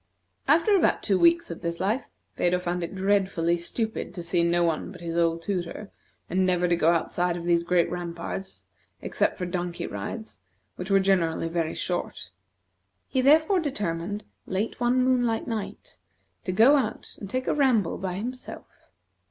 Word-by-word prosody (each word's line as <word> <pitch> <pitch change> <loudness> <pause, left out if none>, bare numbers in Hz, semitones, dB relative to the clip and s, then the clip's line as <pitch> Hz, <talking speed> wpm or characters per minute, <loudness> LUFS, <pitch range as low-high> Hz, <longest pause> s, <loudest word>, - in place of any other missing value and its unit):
After 330 +8 +4
about 380 - +2
two 195 -3 +2
weeks 340 0 +4
of - - -7
this 170 -1 -3
life 215 +8 -1 0.3
Phedo 180 +1 +2
found 180 0 -2
it 170 - -5
dreadfully 190 -3 +1
stupid 220 +8 -3
to 175 - -5
see 170 +1 +1
no 170 +1 +2
one 165 -2 -1
but - - -11
his 165 -1 -4
old 165 -1 +1
tutor, 190 +2 -4 0.4
and 185 +2 +1
never 180 -1 +2
to 175 - +3
go 165 -1 +3
outside 175 +1 0
of 170 - -6
these 170 0 +3
great 175 0 +2
ramparts 175 +2 -6 0.4
except - - 0
for 180 - -3
donkey 175 -1 -3
rides, 100 0 -6 0.3
which 180 +2 -6
were 195 0 +5
generally 170 -4 +1
very 165 -1 -1
short. 175 -1 -3 0.8
He 260 - +1
therefore 315 +7 +5
determined, 205 - -3 0.2
late 200 +6 -2
one 245 +1 +2
moonlight 245 -3 +1
night, 225 -4 -5 0.5
to 185 - -1
go 235 +10 +6
out 235 -6 -3
and 200 - -7
take 255 +4 -2
a - - +1
ramble 250 - +2
by 185 -2 -3
himself. 250 +6 -8
185 Hz, 170 wpm, -26 LUFS, 170-225 Hz, 0.8 s, go